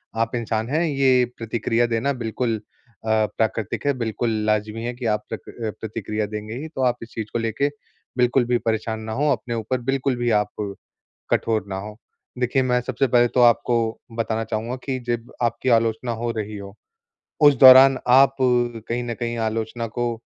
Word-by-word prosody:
आप 115 Hz, +1 st, -1 dB
इंसान 115 Hz, -1 st, -2 dB
हैं 155 Hz, +5 st, +1 dB
ये 135 Hz, -4 st, +3 dB
प्रतिक्रिया 115 Hz, +1 st, 0 dB
देना 120 Hz, +5 st, 0 dB
बिल्कुल 115 Hz, -1 st, -2 dB, 0.5 s
अ, -, -, -6 dB
प्राकृतिक 110 Hz, +1 st, 0 dB
है 140 Hz, -, +3 dB
बिल्कुल 115 Hz, 0 st, -2 dB, 0.2 s
लाज़मी 105 Hz, +1 st, -1 dB
है 120 Hz, +1 st, -3 dB
कि 125 Hz, 0 st, -7 dB
आप 105 Hz, -1 st, 0 dB
प्रक -, -, -5 dB, 0.4 s
प्रतिक्रिया 110 Hz, -1 st, -3 dB
देंगे 105 Hz, +1 st, -6 dB
ही। 160 Hz, -, -5 dB
तो 155 Hz, -4 st, -6 dB
आप 125 Hz, -1 st, +2 dB
इस 115 Hz, -, -11 dB
चीज़ 110 Hz, -2 st, -4 dB
को -, -, 0 dB
लेके 115 Hz, +5 st, 0 dB, 0.5 s
बिल्कुल 125 Hz, 0 st, +3 dB
भी 120 Hz, 0 st, +2 dB
परेशान 110 Hz, -1 st, -2 dB
ना 110 Hz, 0 st, -6 dB
हो, 145 Hz, +5 st, +1 dB
अपने 120 Hz, -2 st, -2 dB
ऊपर 115 Hz, +3 st, -2 dB
बिल्कुल 135 Hz, +1 st, 0 dB
भी 120 Hz, 0 st, 0 dB
आप -, -, -6 dB, 0.8 s
कठोर 110 Hz, -3 st, +1 dB
ना 95 Hz, -1 st, -4 dB
हो। 105 Hz, +2 st, -8 dB, 0.4 s
देखिए 125 Hz, +2 st, +1 dB
मैं 125 Hz, -1 st, +2 dB
सबसे 130 Hz, +2 st, 0 dB
पहले 120 Hz, 0 st, +4 dB
तो 125 Hz, -, +1 dB
आपको 120 Hz, 0 st, +4 dB, 0.4 s
बताना 115 Hz, 0 st, -1 dB
चाहूँगा 115 Hz, +2 st, -3 dB
कि 130 Hz, -2 st, -2 dB
जब 120 Hz, -1 st, -3 dB
आपकी 120 Hz, +2 st, 0 dB
आलोचना 115 Hz, 0 st, +2 dB
हो 115 Hz, +1 st, -3 dB
रही 105 Hz, 0 st, -4 dB
हो, 100 Hz, 0 st, -10 dB, 0.7 s
उस 145 Hz, -1 st, +7 dB
दौरान 130 Hz, 0 st, +9 dB
आप 135 Hz, +2 st, +6 dB
कहीं 120 Hz, -1 st, 0 dB
न 120 Hz, -1 st, -3 dB
कहीं 120 Hz, -1 st, -2 dB
आलोचना 115 Hz, +1 st, -2 dB
को 120 Hz, -1 st, 0 dB
120 Hz, 180 wpm, -22 LUFS, 110-125 Hz, 0.8 s, दौरान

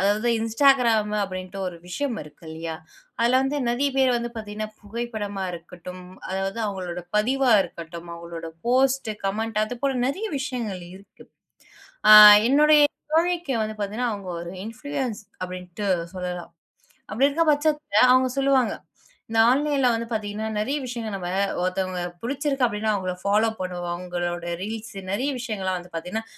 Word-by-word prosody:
அதாவது 205 Hz, +4 st, +2 dB
Instagram 230 Hz, -2 st, +3 dB
அப்படின்ட்டு 185 Hz, 0 st, -7 dB
ஒரு 180 Hz, -2 st, -5 dB
விஷயம் 250 Hz, +6 st, -2 dB
இருக்கு 150 Hz, +2 st, -16 dB
இல்லையா? 160 Hz, 0 st, -5 dB, 0.5 s
அதுல 240 Hz, +2 st, +4 dB
வந்து 270 Hz, +2 st, -1 dB
நறைய 265 Hz, +4 st, +1 dB
பேர் 265 Hz, -1 st, +4 dB
வந்து 235 Hz, 0 st, -3 dB
பாத்தீங்கன்னா 215 Hz, -1 st, -5 dB
புகைப்படமா 210 Hz, -3 st, -4 dB
இருக்கட்டும், 180 Hz, +1 st, -9 dB, 0.3 s
அதாவது 195 Hz, +3 st, -2 dB
அவங்களோட 180 Hz, -3 st, -4 dB
பதிவா 255 Hz, +4 st, +2 dB
இருக்கட்டும், 170 Hz, 0 st, -9 dB
அவங்களோட 170 Hz, -1 st, -8 dB, 0.2 s
போஸ்ட், 260 Hz, -1 st, +2 dB
கமெண்ட் 215 Hz, +2 st, -1 dB
அதுபோல 245 Hz, +4 st, -2 dB
நிறைய 390 Hz, +10 st, -3 dB
விஷயங்கள் 235 Hz, -8 st, -4 dB
இருக்கு. 195 Hz, +1 st, -17 dB, 0.8 s
ஆ -, -, +9 dB, 0.4 s
என்னுடைய 300 Hz, +2 st, +6 dB, 0.3 s
தோழிக்கு 340 Hz, -2 st, +1 dB
வந்து 215 Hz, 0 st, -4 dB
பாத்தீங்கன்னா, 215 Hz, +4 st, -1 dB
அவங்க 200 Hz, -3 st, -7 dB
ஒரு 170 Hz, +1 st, -7 dB
இன்ஃபுளூயன்ஸ் 255 Hz, -1 st, -4 dB, 0.2 s
அப்படின்ட்டு 180 Hz, +2 st, -5 dB, 0.3 s
சொல்லலாம். 180 Hz, -1 st, -5 dB, 0.6 s
அப்படி 245 Hz, +7 st, +3 dB
இருக்க 300 Hz, +4 st, +1 dB
பட்சத்துல 295 Hz, -6 st, +1 dB
அவங்க 255 Hz, 0 st, +4 dB
சொல்லுவாங்க, 270 Hz, -3 st, +3 dB, 0.6 s
இந்த 225 Hz, 0 st, +1 dB
ஆன்லைன்ல 275 Hz, -1 st, +2 dB
வந்து 230 Hz, 0 st, -2 dB
பாத்தீங்கன்னா 215 Hz, 0 st, -3 dB
நிறைய 265 Hz, +8 st, -1 dB
விஷயங்களை 235 Hz, -4 st, -5 dB
நம்ம 180 Hz, -2 st, -5 dB, 0.4 s
ஒருத்தவங்கள 185 Hz, 0 st, -1 dB, 0.2 s
பிடிச்சிருக்கு 275 Hz, +1 st, 0 dB
அப்படின்னா 215 Hz, -1 st, -1 dB
அவங்கள 185 Hz, -2 st, -2 dB
ஃபாலோ 210 Hz, +3 st, +3 dB
பண்ணுவோம். 180 Hz, -1 st, -4 dB
அவங்களோட 175 Hz, -1 st, -4 dB, 0.2 s
ரீல்ஸ் 220 Hz, +1 st, -6 dB, 0.2 s
நிறைய 240 Hz, +8 st, -1 dB
விஷயங்கள் 215 Hz, -5 st, -4 dB
எல்லாம் 185 Hz, -1 st, 0 dB
வந்து 175 Hz, 0 st, -14 dB
பார்த்தீங்கன்னா, 180 Hz, +7 st, -4 dB
215 Hz, 140 wpm, -24 LUFS, 185-255 Hz, 0.8 s, ஆ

